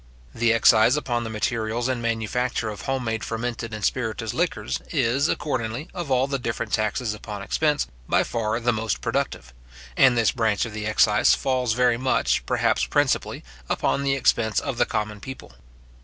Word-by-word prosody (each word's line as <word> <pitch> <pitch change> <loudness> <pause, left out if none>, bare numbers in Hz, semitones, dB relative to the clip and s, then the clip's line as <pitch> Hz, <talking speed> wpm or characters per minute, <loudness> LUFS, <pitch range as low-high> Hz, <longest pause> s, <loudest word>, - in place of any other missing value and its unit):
The 115 0 +2
excise 115 +2 +5
upon 120 -5 -1
the 115 - -5
materials 110 +2 -1
and 130 -2 -1
manufacture 115 +1 -1
of 105 -3 -7
home 135 +4 -2
made 110 -1 -2
fermented 115 0 -4
and 110 -2 -3
spirituous 115 -2 -2
liquors, 65 +1 -1
is, 130 +6 +1
accordingly, 130 0 -2
of 175 -5 -5
all 130 0 +3
the 140 0 -2
different 115 -2 -4
taxes 110 +1 0
upon 105 -1 -7
expense, 150 +6 +1 0.2
by - - +3
far 115 0 -2
the 120 0 +1
most 110 -1 -2
productive; 65 +1 -2 0.4
and 130 -3 +5
this 115 -2 +3
branch 110 -5 +1
of 115 - -8
the 105 0 -4
excise 105 -1 +4
falls 125 -3 0
very 125 0 +3
much, 130 +1 +1
perhaps - - +1
principally, - - 0 0.3
upon - - 0
the 135 -1 +1
expense 115 -4 +2
of 135 -4 -4
the - - +3
common 105 -1 -3
people. 130 - -9
115 Hz, 170 wpm, -24 LUFS, 110-125 Hz, 0.4 s, excise